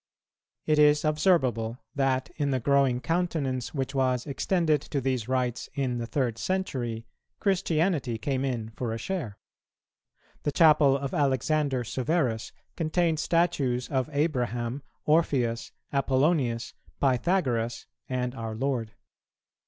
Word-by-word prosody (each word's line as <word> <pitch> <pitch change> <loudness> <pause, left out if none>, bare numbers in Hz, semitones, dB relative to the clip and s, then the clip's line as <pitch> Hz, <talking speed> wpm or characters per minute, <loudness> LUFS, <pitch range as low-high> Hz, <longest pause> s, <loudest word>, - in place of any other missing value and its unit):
It 150 -1 +3
is 150 +1 +5
observable 135 - +2 0.2
that, 135 -2 0
in 145 -2 0
the 130 -2 +1
growing 135 -1 +2
countenance 155 -7 -1
which 135 0 -2
was 130 -2 +1
extended 155 +1 +1
to 145 - -3
these 130 -3 -1
rites 125 -2 -1
in 130 -4 -1
the 115 - -4
third 120 -4 -1
century, 125 -12 -2 0.3
Christianity 165 - +1
came 135 +3 -1
in 120 -5 -2
for 115 0 -3
a - - -3
share. 125 - -4 1.0
The 145 - -1
chapel 150 -3 +5
of 140 -1 -4
Alexander 140 -1 +1
Severus 125 -2 -1 0.2
contained 165 -1 +1
statues 145 -8 +1
of 130 +1 0
Abraham, 125 -4 -1 0.2
Orpheus, 135 -7 +1 0.2
Apollonius, 135 -3 +1 0.3
Pythagoras, 125 -4 +1 0.2
and 125 -1 -1
our 115 -3 -5
Lord. 120 -3 -2
135 Hz, 120 wpm, -27 LUFS, 120-155 Hz, 1.0 s, is